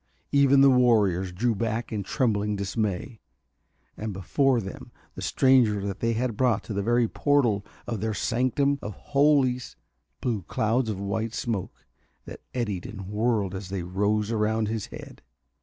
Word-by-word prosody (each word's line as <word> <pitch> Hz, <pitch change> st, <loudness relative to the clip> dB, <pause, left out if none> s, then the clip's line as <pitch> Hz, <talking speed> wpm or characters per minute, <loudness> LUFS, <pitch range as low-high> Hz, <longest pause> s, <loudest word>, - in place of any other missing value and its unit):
Even 140 Hz, -1 st, +5 dB
the 135 Hz, 0 st, +7 dB
warriors 105 Hz, -8 st, +3 dB
drew 115 Hz, +7 st, 0 dB
back 115 Hz, +2 st, -2 dB
in 105 Hz, -2 st, -2 dB
trembling 105 Hz, -2 st, 0 dB
dismay. 100 Hz, +2 st, -3 dB, 0.8 s
And 110 Hz, -1 st, -5 dB
before 125 Hz, -, +1 dB
them 95 Hz, -3 st, -8 dB, 0.2 s
the -, -, -8 dB
stranger 110 Hz, -7 st, +3 dB
they 115 Hz, +4 st, -1 dB
had 120 Hz, 0 st, -1 dB
brought 120 Hz, -3 st, +1 dB
to 110 Hz, -, -6 dB
the 100 Hz, -, -1 dB
very 120 Hz, +3 st, +2 dB
portal 120 Hz, -7 st, +1 dB, 0.2 s
of 115 Hz, -4 st, -4 dB
their 110 Hz, -1 st, -1 dB
sanctum 130 Hz, +5 st, +1 dB
of 105 Hz, -2 st, -6 dB
holies 140 Hz, -3 st, +2 dB, 0.4 s
blew 115 Hz, -5 st, -1 dB
clouds 110 Hz, +6 st, 0 dB
of 100 Hz, -3 st, -3 dB
white 110 Hz, +3 st, -2 dB
smoke 110 Hz, -6 st, -4 dB, 0.4 s
that -, -, -10 dB
eddied 105 Hz, -8 st, -3 dB
and 100 Hz, -3 st, -8 dB
whirled 105 Hz, -2 st, 0 dB
as 95 Hz, -1 st, -6 dB
they 95 Hz, -2 st, -3 dB
rose 105 Hz, +4 st, 0 dB
round 110 Hz, 0 st, 0 dB
his 110 Hz, -2 st, -3 dB
head. -, -, -11 dB
110 Hz, 155 wpm, -26 LUFS, 100-125 Hz, 0.8 s, the